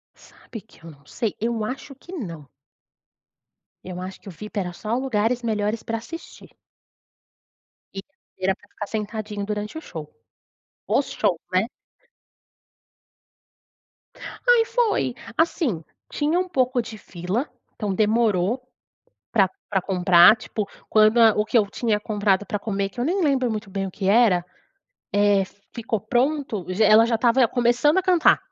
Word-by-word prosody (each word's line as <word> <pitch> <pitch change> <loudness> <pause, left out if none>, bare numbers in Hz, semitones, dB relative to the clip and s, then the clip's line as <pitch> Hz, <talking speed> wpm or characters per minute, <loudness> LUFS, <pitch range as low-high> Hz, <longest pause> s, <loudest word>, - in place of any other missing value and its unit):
Sabe 225 - -12
que 205 -5 -23
eu 165 - -10
não 140 -2 -17
sei. 225 -4 -3
Eu 230 0 -1
acho 265 +4 -6
que 350 +7 -13
não. 170 - -7 1.4
Eu 180 0 -6
acho 185 +1 -7
que - - -18
o - - -6
VIP 210 +4 -6
era 180 -2 -3
só 220 +6 -3
lugares 245 -2 0
melhores 215 -1 -1
pra 225 0 -3
assistir. 330 +9 -10 1.5
E, - - -4 0.4
era 190 +1 +2
pra 205 - -23
ficar 205 - -7
sentadinho 210 -1 -4
durante 210 +5 -4
o - - -6
show. 160 - -9 0.8
Os - - +1
shows, 170 - 0
né? 185 +4 +2 2.8
Aí 480 -2 +6
foi. 450 - +1 0.2
Assim, 305 - +1 0.3
tinha 310 +4 0
um 370 - -1
pouco 255 -6 +1
de 230 -1 -9
fila, 190 - -4 0.3
então 205 -2 -2
demorou 215 +1 +2 0.7
pra 195 -4 +4 0.2
pra 190 -3 0
comprar, 180 +1 +6
tipo, 215 -2 -5 0.2
quando 215 +2 +4
a 225 -1 +8
o 210 - +2
que 235 +2 +2
eu 210 - +3
tinha 215 +1 0
comprado 205 -2 0
pra 205 - -2
comer, 200 -2 -2
que 240 - -8
eu - - +1
nem 365 +6 0
lembro 265 -4 +2
muito 215 -2 -4
bem 195 0 -2
o - - -6
que 190 +1 -3
era, 200 -5 +4 0.7
eh, 205 -1 +4 0.3
ficou 225 -2 -2
pronto, 260 - -1
já 185 +4 +2
ela 215 +2 +7
já 235 - 0
estava 240 +2 +4
começando 245 +6 +2
a - - +2
cantar 360 -3 +4
215 Hz, 155 wpm, -23 LUFS, 195-245 Hz, 2.8 s, a